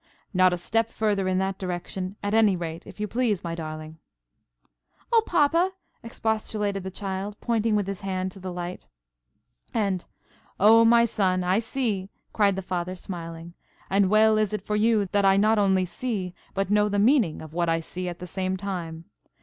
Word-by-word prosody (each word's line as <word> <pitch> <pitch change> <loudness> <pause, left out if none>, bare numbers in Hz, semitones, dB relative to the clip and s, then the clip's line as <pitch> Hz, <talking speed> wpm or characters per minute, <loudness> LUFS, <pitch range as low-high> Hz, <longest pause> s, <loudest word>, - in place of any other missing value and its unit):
"Not 185 -1 +5
a 180 - -1
step 225 +6 0
further 205 -4 0
in 185 0 +1
that 190 0 -1
direction, 185 +1 -4
at 205 +1 -1
any 220 -3 +5
rate, 165 -1 -6
if - - -12
you 210 - -1
please, 225 -4 0
my 170 -1 -3
darling." 155 -1 -7 1.1
"Oh, 455 - +7
papa!" 340 +3 +3 0.3
expostulated 215 -3 -2
the 190 - -5
child, 195 +1 -5
pointing 225 -2 +1
with 205 -2 +1
his 195 -1 -5
hand 190 -1 -2
to 195 - -13
the 185 0 -5
light. 175 0 -6 0.9
And, 195 -5 0 0.6
"Oh, 225 +3 +7
my 235 0 +6
son, 185 -5 +1
I 185 +3 +2
see!" 220 -5 -2 0.2
cried 200 -3 +3
the 195 - -4
Father, 180 0 -3
smiling; 170 -2 -7 0.4
"and 195 -1 +3
well 215 +1 +5
is 215 -1 0
it 210 - -3
for 210 - -1
you 215 -1 +3
that 200 -1 +2
I 195 0 +5
not 215 +2 +4
only 190 -2 +3
see, 190 -2 -4 0.2
but 195 0 -1
know 210 0 +3
the 205 - -1
meaning 215 - +3
of 155 -1 -11
what 170 0 0
I 165 0 +2
see 180 +2 -5
at 175 - -7
the 180 - -7
same 185 +1 -2
time. 170 -4 -5
195 Hz, 185 wpm, -26 LUFS, 180-215 Hz, 1.1 s, Oh